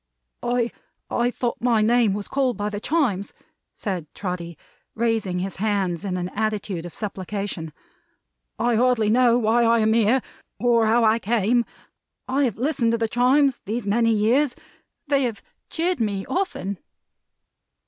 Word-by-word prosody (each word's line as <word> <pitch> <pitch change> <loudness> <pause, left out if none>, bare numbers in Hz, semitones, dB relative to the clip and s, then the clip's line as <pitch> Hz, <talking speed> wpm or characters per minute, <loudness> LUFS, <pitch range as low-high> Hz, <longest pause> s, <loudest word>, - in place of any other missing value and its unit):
"I 240 -1 0 0.6
thought 245 -1 -3
my 230 -3 +3
name 230 -2 +3
was 205 -1 -5
called 265 -3 0
by 205 0 -2
the 205 - -4
Chimes!" 240 - 0 0.4
said 180 -8 -4
Trotty, 175 -3 -5 0.4
raising 220 -5 0
his 190 +1 -4
hands 195 -4 -1
in 185 -2 -2
an 180 0 -3
attitude 205 -4 -2
of 175 - -12
supplication. 195 -4 -4 0.9
"I 240 -1 +1
hardly 240 -3 +3
know 240 0 +4
why 235 0 +2
I 230 0 +4
am 220 -1 +3
here, 230 +3 +3 0.4
or 235 -2 +3
how 230 +2 +3
I 220 +1 +4
came. 230 +2 +1 0.6
I 270 +2 +2
have 230 -6 -2
listened 245 -3 +1
to - - +2
the 225 -1 0
Chimes 255 +3 +3
these 220 +2 -3
many 230 +3 +2
years. 240 +6 +2 0.5
They 280 -1 +2
have 225 -4 -4 0.3
cheered 350 +2 -1
me 200 -4 -1
often." 200 - -2
225 Hz, 150 wpm, -23 LUFS, 200-245 Hz, 0.9 s, know